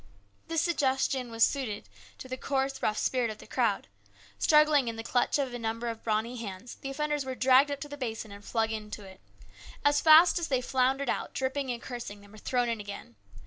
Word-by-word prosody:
The 330 0 -3
suggestion 265 -6 +1
was 225 0 +2
just - - +4
suited 245 -7 -4 0.3
to - - -9
the 255 - -4
coarse, 270 0 -2
rough 215 0 0
spirit 250 -3 +1
of 215 - -6
the - - -13
crowd. 230 -6 0 0.5
Struggling 300 -4 +5
in 230 - -2
the 225 - -6
clutch 245 +4 +1
of 270 -3 -2
a 245 - -4
number 230 +1 -2
of 225 -1 -6
brawny 225 +3 -1
hands, 205 0 -7
the 275 - -6
offenders 295 +1 -1
were 260 -1 -4
dragged 260 +3 +5
up 285 -1 -3
to 295 - -5
the 290 0 -8
basin 225 -5 -4
and 200 0 -11
flung 225 0 0
into 210 -1 -6
it. 190 -1 -13 0.6
As 290 0 +4
fast 325 +3 +7
as 335 - -2
they 260 -2 +1
floundered 260 +2 +1
out, - - -2
dripping 265 +1 -1
and 240 -1 -2
cursing, 235 -5 -7
they 205 - -16
were 215 +1 -14
thrown 245 +2 0
in 230 -2 -1
again. 205 - -8
250 Hz, 220 wpm, -29 LUFS, 225-275 Hz, 0.6 s, fast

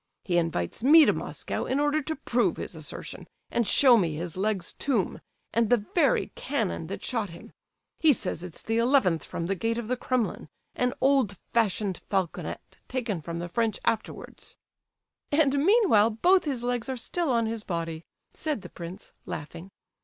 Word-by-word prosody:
He 175 -2 +2
invites 165 - -2
me 305 +4 +8
to - - +4
Moscow - - -4
in 265 - 0
order 295 +1 +2
to 315 +2 -3
prove 245 -4 0
his - - -5
assertion, - - -8 0.2
and 235 -3 +1
show 255 -4 +6
me 170 -7 +1
his 170 +1 -4
leg's 195 -2 -1
tomb, 240 -10 -1 0.3
and 230 -2 +2
the 235 -4 +3
very 345 - +2
cannon - - -2
that - - -6
shot 225 -6 -1
him; 170 - -12 0.5
he 315 - +6
says 180 - -2
it's 180 -3 -8
the 225 +1 0
eleventh 230 - +3
from 170 - -4
the 195 - 0
gate 225 +5 -1
of 235 -2 -4
the 255 - +2
Kremlin, 250 -2 -2 0.2
an 250 0 0
old 265 -8 +3 0.2
fashioned 210 -4 +1
falconet 190 -4 -3
taken 230 -9 -2
from 170 +2 -5
the 170 +1 -4
French 220 +4 0
afterwards." 225 -1 -3 0.8
"And, 285 -2 +3
meanwhile 365 - +5
both 355 - +3
his 265 -5 -2
legs 245 0 -1
are 260 - -2
still 335 +6 -2
on 230 -2 +2
his 220 -1 -3
body," 165 -3 -4 0.3
said 300 -10 -3
the 180 - -9
prince, 175 +4 -9 0.2
laughing. 165 +4 -7
225 Hz, 175 wpm, -27 LUFS, 180-265 Hz, 0.8 s, me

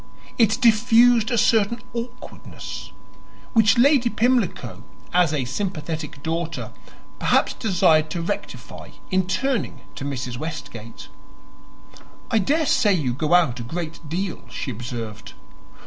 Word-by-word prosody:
It 225 0 +4
diffused 235 0 +5
a 240 - 0
certain 225 +1 +3
awkwardness, 245 +1 -8 0.6
which 220 -3 +5
Lady 255 -1 +5
Pimlico, 240 -4 0 0.3
as 175 -3 +4
a 145 -5 -1
sympathetic 155 -1 -4
daughter, 165 +1 -3 0.5
perhaps - - +2
desired 165 -7 +3
to 170 +2 -3
rectify - - -6 0.2
in 185 -1 +2
turning 260 +1 -1
to - - -7
Mrs. 125 -3 -4
Westgate. 120 -8 -7 1.2
"I 225 - +4
daresay 275 - +2
you 135 -8 -1
go 155 +6 +2
out 135 -9 +3
a - - -4
great 165 +5 -5
deal," 180 +2 -3
she 135 - -4
observed. 115 -2 -7
180 Hz, 115 wpm, -23 LUFS, 150-230 Hz, 1.2 s, diffused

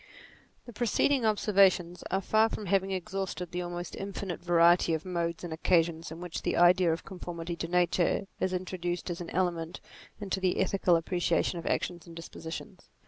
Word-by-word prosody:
The 240 - -10
preceding 240 +2 +2
observations 190 -4 +3
are 190 +1 0
far 220 +3 +3
from 215 - -5
having 195 0 +1
exhausted 190 -1 -4
the 180 - -2
almost 175 0 -5
infinite 195 -2 -5
variety 170 -1 +4
of 160 - -6
modes 170 -2 -2
and 170 -2 -4
occasions 165 -1 +1
in 165 - -7
which 175 -1 -5
the - - -1
idea 175 0 +5
of 165 - -3
conformity 175 -2 -6
to 165 - -3
nature 175 +2 +1
is 185 - 0
introduced 180 -1 -3
as 170 - -5
an 170 - -6
element 170 -2 -1 0.4
into 195 -2 -2
the 185 -1 +1
ethical 190 -2 +3
appre 175 +2 -3
ciation 175 - +1
of 165 - -7
actions 175 -1 -2
and 165 - -11
dispositions. 165 +3 -8
180 Hz, 175 wpm, -29 LUFS, 170-190 Hz, 0.4 s, idea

